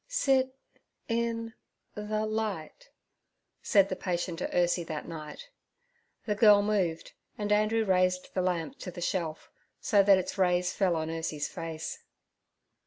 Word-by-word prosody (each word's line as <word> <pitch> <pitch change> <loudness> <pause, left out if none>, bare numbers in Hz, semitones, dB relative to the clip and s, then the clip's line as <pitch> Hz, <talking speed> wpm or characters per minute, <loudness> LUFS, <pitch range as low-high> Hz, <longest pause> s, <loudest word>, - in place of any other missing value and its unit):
'Sit—in—the—light' 230 - -3 0.7
said 195 -2 +4
the - - -3
patient 175 -2 -3
to - - -1
Ursie 175 0 +1
that 155 -2 -5
night. 165 - -8 0.7
The 210 - +1
girl 205 -1 +6
moved, 190 -6 -1 0.3
and 210 -1 -2
Andrew 215 +2 +2
raised 185 -1 +1
the 185 - 0
lamp 180 - -2
to 185 - -6
the 175 - -8
shelf, 170 -3 -3 0.3
so 205 -2 +4
that 195 -1 +6
its 185 +2 -4
rays 180 -1 +2
fell 185 -4 +1
on 160 0 -2
Ursie's 160 -2 -3
face. 160 -1 -6
195 Hz, 125 wpm, -29 LUFS, 175-215 Hz, 0.7 s, girl